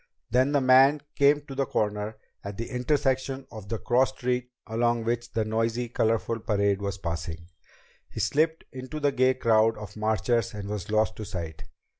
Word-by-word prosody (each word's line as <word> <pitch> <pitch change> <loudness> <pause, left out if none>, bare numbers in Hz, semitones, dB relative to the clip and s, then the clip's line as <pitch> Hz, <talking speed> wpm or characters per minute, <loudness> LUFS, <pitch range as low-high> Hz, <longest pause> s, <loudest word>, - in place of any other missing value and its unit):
Then 130 +3 +3
the 145 -1 +3
man 135 +3 +6
came 145 +1 +4
to 145 -1 -10
the 135 -1 -1
corner, 105 0 -1 0.3
at 100 0 -6
the 115 - -4
intersection 130 +1 0
of 105 -3 -9
the 115 - -1
cross 125 +4 +2
street 125 -1 -2 0.2
along 120 +1 0
which 120 +1 -2
the 110 -1 0
noisy, 115 +2 -1
colorful 115 0 0
parade 100 -2 +1
was 100 0 -3
passing. 85 -1 -5 0.6
He - - -7
slipped 160 +2 +1
into 130 +4 -6
the 145 -1 +2
gay 130 -1 +3
crowd 115 -2 +3
of 105 -1 -9
marchers 110 +1 0
and 100 -1 -6
was 105 -3 -4
lost 110 0 +1
to 110 - -5
sight. 85 -6 -6
115 Hz, 175 wpm, -27 LUFS, 105-130 Hz, 0.6 s, man